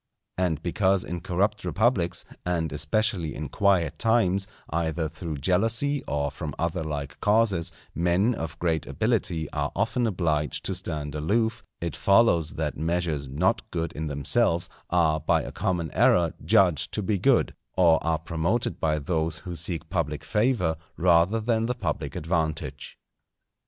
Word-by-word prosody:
And 85 -4 -1
because 95 +2 +2
in 85 0 -5
corrupt 100 +4 0
republics, 90 -1 +1 0.2
and 85 -4 -1
especially 85 +2 0
in 75 -2 -5
quiet 85 -5 +1
times, 100 -4 +2 0.2
either 80 0 -1
through 80 0 -6
jealousy 115 - +2
or 70 -1 -1
from 75 -1 -6
other 85 -1 -1
like 75 -3 -5
causes, 105 -5 +2 0.2
men 90 +7 +2
of 80 -5 -5
great 80 -3 -1
ability 80 -2 0
are - - -2
often 120 -2 +1
obliged 80 -7 -1
to - - 0
stand 75 -2 -4
aloof, 110 +9 0 0.2
it 85 -5 -3
follows 100 -7 +3
that 80 -2 -2
measures 80 -3 -1
not 90 - 0
good 85 -4 -3
in 80 +1 -4
themselves 85 - +1 0.2
are 80 -3 +2
by - - +1
a - - -6
common 90 -4 -2
error 85 -2 +3
judged 90 -7 +3
to 105 - -1
be 100 0 0
good, - - +3 0.2
or 85 -3 +5
are 80 -1 +1
promoted 85 +8 -1
by 75 -1 +1
those 80 +1 -1
who 90 -2 -5
seek 80 0 -2
public 75 -5 -1
favour 105 -8 +1 0.2
rather 90 +5 +4
than 115 0 0
the 125 - -1
public - - -3
advantage. 80 -1 -3
85 Hz, 150 wpm, -26 LUFS, 80-100 Hz, 0.2 s, or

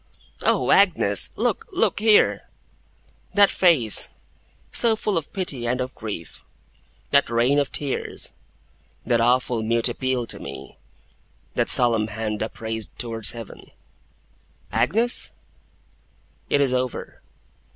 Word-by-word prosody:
'Oh, - - +1
Agnes! - - +4
Look, 455 - -2
look, 370 - +1
here!' 215 0 +3 0.9
That 200 -1 +5
face, 150 - +3 0.6
so 230 -2 +4
full 210 -2 -2
of 165 -3 -3
pity, 145 -11 -4
and 125 +2 -1
of 130 +1 -4
grief, 105 -7 -8 0.7
that 140 0 +3
rain 120 +5 +2
of 140 - -1
tears, 140 -3 -4 0.7
that 120 -1 +1
awful 125 -1 +1
mute 115 +2 +1
appeal 130 0 -2
to - - -6
me, 70 0 -10 0.7
that - - 0
solemn 115 -3 +4
hand 110 -1 -4
upraised 110 0 -5
towards 115 -3 -2
Heaven! 115 -3 -11 1.0
'Agnes?' 230 +7 +2 1.2
It 145 - +2
is 135 -2 +1
over. 130 -1 -4
125 Hz, 115 wpm, -23 LUFS, 115-145 Hz, 1.2 s, That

